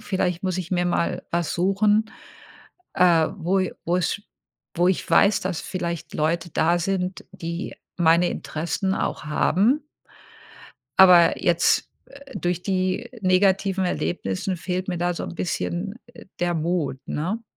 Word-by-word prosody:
Vielleicht 185 -4 -1
muss 185 -1 -1
ich 175 -2 -5
mir 175 -1 +1
mal 175 -1 -1
was 170 -2 -1
suchen, 205 +4 +2 0.8
äh, 170 -3 +4
wo 190 +2 +1 0.2
wo‘s 180 +4 0 0.6
wo 175 +2 +3
ich 185 - -1
weiß, 200 0 +4
dass 185 -3 -3
vielleicht 170 -3 -5
Leute 170 +3 -1
da 170 +3 +2
sind, 185 +1 -2
die 170 +2 -5 0.2
meine 170 0 +4
Interessen 170 +5 -2
auch - - -2
haben.“ 205 - +2 1.1
Aber 180 -3 +7
jetzt, 175 -2 +2 0.2
äh, 280 0 -12
durch 175 0 -1
die 185 +3 -1
negativen 190 0 +2
Erlebnissen 175 - -2
fehlt 185 +2 -3
mir 180 -2 -2
da 175 0 0
so - - -4
‘n - - -7
bisschen, 180 +2 -3 0.2
äh, - - -14
der 175 0 0
Mut, 160 -4 -1
ne? 195 +10 -3
180 Hz, 135 wpm, -23 LUFS, 170-190 Hz, 1.1 s, Aber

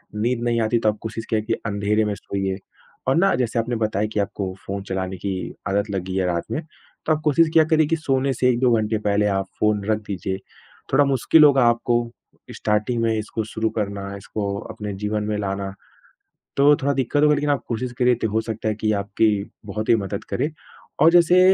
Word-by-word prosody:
नींद 120 +3 0
नहीं 120 -1 +1
आती, 110 +2 +2
तो 110 - +2
आप 105 - -2
कोशिश 110 0 -5
किया 110 -1 +1
कि 110 +1 -2
अँधेरे 105 +1 +1
में 105 - -1
सोइए। 95 -1 -3 0.5
और 130 - +3
ना 195 +4 +4
जैसे 120 -2 0
आपने 120 +1 -1
बताया 110 -2 0
कि 105 - 0
आपको 100 -1 -2
फ़ोन 100 0 -4
चलाने 95 0 -3
की 95 +1 -3 0.3
आदत 100 +2 0
लगी 95 -1 -3
है 95 - +1
रात 85 -1 0
में, 155 - -1 0.4
तो 155 - +3
आप 155 - -2
कोशिश 155 +2 +4
किया 160 - +7
करे 155 -1 +3
कि 165 - +1
सोने 135 -2 0
से 125 +1 +2
1-2 125 0 +3
घंटे 110 0 0
पहले 105 +1 +2
आप 95 -1 0
फ़ोन 105 -2 +2
रख 110 0 +1
दीजिए। 95 -1 -3 0.6
थोड़ा 145 - +5
मुश्किल 135 +4 +4
होगा 140 -3 +6
आपको 120 0 +1 0.6
स्टार्टिंग 105 +3 0
में 115 -1 +2
इसको 110 +1 -3
शुरू 110 0 -2
करना, 100 -1 -4
इसको 100 0 -4
अपने 105 -1 -6
जीवन 105 0 -1
में 105 0 -2
लाना, 100 -1 -3 0.8
तो 145 +1 +6
थोड़ा 140 +1 +2
दिक्कत 140 +3 +1
होगा 150 0 +5
लेकिन 145 +1 0
आप 140 - +1
कोशिश 120 +1 -3
करिए 125 0 +4
ति - - +3
हो 110 +1 +1
सकता 110 -1 -4
है 105 - 0
कि 110 0 0
आपकी 105 +2 +2 0.3
बहुत 110 +1 -4
ही - - +6
मदद 100 -1 -4
करे। 150 - 0 0.5
और 160 +3 +7
जैसे 175 +1 +6
110 Hz, 210 wpm, -22 LUFS, 100-130 Hz, 0.8 s, किया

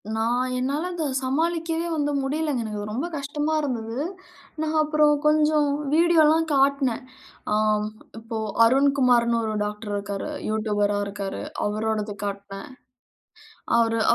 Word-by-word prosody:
நான் 245 +3 0
என்னால 280 +6 -1
அத 330 -2 -3 0.2
சமாளிக்கவே 330 +5 -1
வந்து 290 -1 0
முடியலங்க. 290 -2 -1
எனக்கு 215 -2 -5
அது 205 +1 -5
ரொம்ப 275 +9 -2
கஷ்டமா 295 +2 -2
இருந்தது. 230 -5 -3 0.6
நான் 315 0 -1
அப்புறம் 305 0 +3
கொஞ்சம் 300 -1 +3 0.2
வீடியோலாம் 325 -1 +4
காட்னன். 275 -2 +2 0.5
ஆ - - +3 0.7
இப்போ 225 0 -5 0.3
அருண்குமார்னு 250 -3 +3
ஒரு 215 0 -2
டாக்டர் 210 0 -5
இருக்காரு. 200 -1 -4 0.2
யூட்யூபர்ரா 205 -1 0
இருக்காரு. 200 -1 -5 0.3
அவரோடது 215 0 -2
காட்டுனேன். 200 +1 -6 1.1
அவுரு 230 -1 +2
255 Hz, 115 wpm, -24 LUFS, 220-300 Hz, 1.1 s, வீடியோலாம்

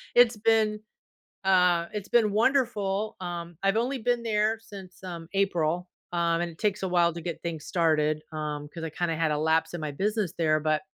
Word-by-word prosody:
it's 240 -2 +6
been, 215 -1 +2 0.6
uh 180 -3 +4
it's 210 -2 -5
been 225 -4 +4
wonderful, 215 -4 +1
um 170 -1 -5
I've 195 +2 +3
only 255 +4 0
been 240 +1 0
there 220 0 +1
since, 190 -4 -12
um, 170 -3 -7
April, 180 -3 +1 0.2
um, 170 -1 +1
and 175 0 -2
it 160 - -16
takes 210 -2 0
a - - +1
while 175 -2 +3
to 170 - -7
get 170 0 -5
things 160 -3 -4
started, 155 -3 +1
um, 150 -1 -4
'cause 165 - -7
I 165 - -2
kinda 165 +1 -1
had 160 -1 +1
a 150 - +1
lapse 160 +2 +1
in 175 - -4
my 150 -1 -3
business 205 +2 -1
there, 155 -2 +2
but 155 0 +1
175 Hz, 195 wpm, -27 LUFS, 160-210 Hz, 0.6 s, it's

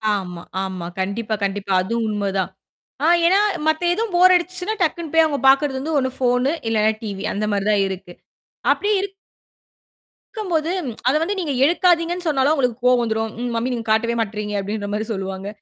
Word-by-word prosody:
ஆமா, 180 -3 -5 0.2
ஆமா. 185 -2 -5
கண்டிப்பா, 210 +4 -2
கண்டிப்பா. 200 0 -2
அது 190 +5 -4
உண்ம 205 -2 -1
தான். - - -2 0.5
ஆ - - +4 0.2
ஏன்னா 380 +3 +4 0.3
மத்த 315 +2 +1
எதுவும் 435 +1 -2
போர் 365 +1 +7
அடிச்சுச்சுன்னா, 365 +4 -2
டக்குன்னு 330 -2 -1
போய் 325 0 +6
அவங்க 290 -3 -1
பார்க்குறது 270 0 +4
வந்து 310 +4 -2
ஒண்ணு 260 -1 0
ஃபோனு, 250 +1 +2 0.2
இல்லைன்னா 220 -1 +3
டிவி 200 -3 -5
அந்த 210 +1 -1
மாரி 200 -1 -1
தான் 205 -2 +3
இருக்கு. 185 -2 -7 0.6
அப்படி 410 - -1
இருக் 395 0 -4 1.2
கும்போது, 340 -7 -1 0.4
அத 260 - +4
வந்து 385 +5 -1
நீங்க 315 -6 -2
எடுக்காதீங்கன்னு 350 +2 +2
சொன்னாலும் 285 -1 +2
அவங்களுக்குக் 250 -5 -1
கோவம் 250 -1 +5
வந்துரும். 220 -1 -1
"ம் 245 - -2
மம்மி 235 +3 -1
நீங்க 230 -2 -4
காட்டவே 230 +2 +2
மாட்டேறீங்க." 210 -1 -3
அப்படீன்ற 205 +1 -4
மாரி 215 +1 -1
சொல்லுவாங்க. 190 -1 -4
245 Hz, 175 wpm, -21 LUFS, 205-325 Hz, 1.2 s, போர்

